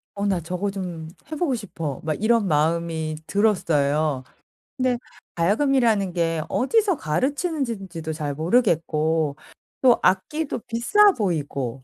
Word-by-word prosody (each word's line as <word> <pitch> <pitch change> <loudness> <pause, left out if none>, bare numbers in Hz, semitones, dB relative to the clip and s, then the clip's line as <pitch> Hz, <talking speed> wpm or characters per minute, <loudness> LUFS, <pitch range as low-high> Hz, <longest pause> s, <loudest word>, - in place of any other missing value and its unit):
'어 200 0 -2
나 190 -4 +1
저거 180 +4 -3
좀 175 -5 -6 0.2
해 - - -2
보고 290 -5 0
싶어.' 165 - -5
막 155 +4 -2
이런 225 -2 +3
마음이 160 0 0
들었어요. 155 -9 +1 0.5
근데 255 -1 +1 0.4
가야금이라는 215 0 +2
게 165 -2 0
어디서 390 - +2
가르치는지 260 - -1
지도 165 -2 -5
잘 150 -2 -3
모르겠고 160 - +1 0.4
또 255 -2 +5
악기도 275 +12 0
비싸 390 - +4
보이고 140 - -2
180 Hz, 270 characters per minute, -23 LUFS, 155-235 Hz, 0.5 s, 또